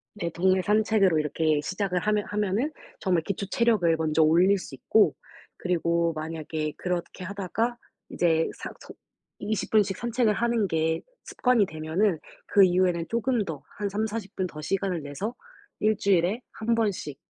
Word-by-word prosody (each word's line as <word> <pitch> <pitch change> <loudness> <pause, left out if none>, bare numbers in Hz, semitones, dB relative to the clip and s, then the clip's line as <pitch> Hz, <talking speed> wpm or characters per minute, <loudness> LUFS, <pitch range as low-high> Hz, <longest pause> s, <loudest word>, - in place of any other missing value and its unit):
네. 170 -5 -3
동네 185 +2 +2
산책으로 210 -4 +3
이렇게 150 0 +1
시작을 185 +3 -1
하면 210 +2 0
하면은 210 +7 0 0.3
정말 180 -4 +1
기초 200 +3 -3
체력을 210 -7 +2
먼저 160 0 +1
올릴 175 +6 +5
수 165 -7 -8
있고 190 +3 +3 0.4
그리고 170 -1 +1
만약에 155 -1 -4
그렇게 180 0 -3
하다가 205 +5 -2 0.3
이제 165 -2 +2
사 - - -6
서 - - -11 0.5
20 215 0 -2
분씩 200 -3 +3
산책을 235 -2 +1
하는 235 -1 +1
게 160 -1 0 0.2
습관이 250 -5 +2
되면은 160 +3 0 0.3
그 200 - +5
이후에는 180 -2 +2
쪼금 235 -1 +1
더 150 -6 -6
한 205 -1 -2
30-40 210 0 -3
분 185 - -1
더 155 -3 -9
시간을 190 0 -1
내서 145 - -4 0.5
1 215 0 +2
주일에 195 +4 +2
1 230 +1 -1
번씩 200 -10 -1
185 Hz, 290 characters per minute, -26 LUFS, 165-210 Hz, 0.5 s, 올릴